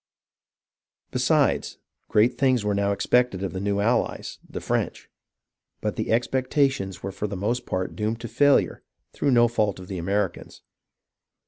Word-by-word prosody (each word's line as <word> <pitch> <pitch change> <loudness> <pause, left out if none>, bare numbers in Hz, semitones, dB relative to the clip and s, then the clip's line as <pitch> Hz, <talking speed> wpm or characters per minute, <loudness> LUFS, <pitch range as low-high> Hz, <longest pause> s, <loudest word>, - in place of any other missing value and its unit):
Besides, - - +1 0.3
great 115 +3 +3
things 130 -5 +2
were 105 - +1
now 100 0 +1
expected 110 -1 +1
of 95 - -3
the 95 - -3
new 100 +1 0
allies, 115 +4 0
the - - -5
French; - - -2 0.7
but - - -2
the - - -2
expectations 130 - 0
were 95 - -3
for 105 +2 -3
the 100 -1 -5
most 115 +6 -2
part 95 0 -2
doomed 110 +2 -2
to 115 - -5
failure 145 +5 +3 0.3
through 145 - 0
no 120 -2 +5
fault 105 -4 0
of 90 - -11
the 95 -2 -4
Americans. 100 +3 -2
105 Hz, 150 wpm, -25 LUFS, 100-125 Hz, 0.7 s, no